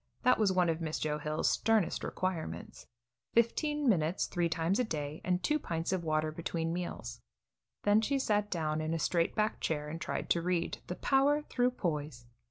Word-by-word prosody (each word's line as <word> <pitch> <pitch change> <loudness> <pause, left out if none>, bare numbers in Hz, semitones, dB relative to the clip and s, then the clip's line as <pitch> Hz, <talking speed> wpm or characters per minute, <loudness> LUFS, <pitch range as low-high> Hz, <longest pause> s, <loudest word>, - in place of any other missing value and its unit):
That 255 -2 +4
was 210 -3 +4
one 180 -2 +3
of 165 0 0
Miss 155 -1 -2
Joe 150 -1 -1
Hill's 150 +1 -1
sternest 220 -5 +2
requirements 165 - -4 0.5
fifteen 295 +5 +2
minutes 175 -5 +2
three 175 -2 0
times 165 +5 +1
a - - +3
day 150 -7 -4
and 180 0 0
two 305 0 +2
pints 165 - -2
of 185 -2 0
water 155 -1 0
between 165 +1 -2
meals. 175 0 -5 0.6
Then 205 +1 +5
she 275 +5 +1
sat 210 -5 +1
down 155 -4 -1
in 160 +1 -1
a - - 0
straight 170 +1 +1
back 215 0 0
chair 150 -2 -2
and 165 +2 -6
tried - - -3
to 170 - +3
read 175 0 -1
"The 180 - -3
Power 285 +5 +3
Through 250 -4 +1
Poise." 150 -8 -3
175 Hz, 185 wpm, -32 LUFS, 155-215 Hz, 0.6 s, Then